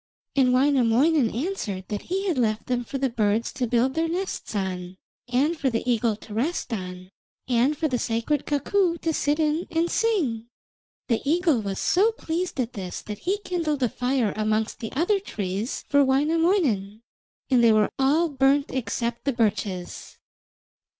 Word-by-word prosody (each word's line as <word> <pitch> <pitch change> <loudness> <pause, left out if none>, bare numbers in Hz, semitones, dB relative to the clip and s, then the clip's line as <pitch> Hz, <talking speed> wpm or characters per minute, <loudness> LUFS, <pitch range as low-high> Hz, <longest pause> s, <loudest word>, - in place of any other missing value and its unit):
And 260 -2 +4
Wainamoinen 265 +1 +3
answered 230 - -3
that 205 -1 -3
he 385 +3 -3
had 355 - +1
left 215 -2 0
them 245 -1 -1
for 275 - -5
the 270 0 +1
birds 220 0 0
to 250 - -1
build 245 +3 +2
their 325 +2 0
nests 360 - -4
on, 185 -2 -3 0.3
and 270 +7 +1
for 280 -4 0
the 230 0 -3
eagle 230 -2 +2
to 210 0 -12
rest 250 +2 -1
on, 185 -2 -6 0.4
and 255 +4 +2
for 320 - +1
the 250 -4 -1
sacred 230 +7 -1
cuckoo 340 +4 +1
to 325 -1 -1
sit 290 0 +1
in 310 +2 0
and 330 +1 0
sing. 300 - 0 0.6
The 230 -3 +1
eagle 320 -4 +2
was 195 -2 -4
so 410 +6 +3
pleased 345 - -3
at 245 -1 -1
this 185 -3 -6
that 210 -1 -7
he 385 +3 0
kindled 310 -6 -1
a 245 - +2
fire 250 -4 0
amongst 215 +1 -1
the 225 - -5
other 360 +8 +2
trees 205 - -4
for 285 0 +4
Wainamoinen, 275 - +1 0.5
and 245 -2 +5
they 230 - +7
were 215 -1 +3
all 295 +6 +3
burnt 275 0 +2
except 235 -1 -3
the 275 - +1
birches. 205 -5 -2
255 Hz, 170 wpm, -25 LUFS, 220-320 Hz, 0.6 s, they